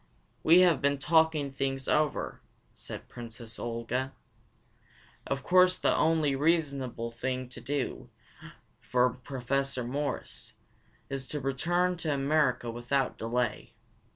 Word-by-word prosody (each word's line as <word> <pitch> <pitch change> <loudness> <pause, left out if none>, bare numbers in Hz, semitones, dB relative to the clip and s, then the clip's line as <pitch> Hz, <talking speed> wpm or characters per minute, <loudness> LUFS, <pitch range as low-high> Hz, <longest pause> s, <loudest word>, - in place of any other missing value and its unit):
"We 170 +3 +7
have 170 -6 +4
been 140 0 +2
talking 160 -1 +3
things 135 -1 -2
over," 150 -1 0 0.3
said - - -9
Princess 115 -1 -9
Olga. 120 +3 -2 1.1
"Of 135 -1 -2
course 180 0 +5
the - - +2
only 155 -3 +2
reasonable 140 -6 0
thing 125 +1 -3 1.3
for 125 0 +2
Professor 135 +1 -2
Morris 140 +4 -3
to - - -15 0.6
do - - -6
is 135 -1 -3
to 150 - -3
return 175 +7 0
to 160 -2 -2
America 135 -4 +1
without 125 +3 -1
delay. 115 -1 -2
135 Hz, 115 wpm, -30 LUFS, 125-155 Hz, 1.3 s, We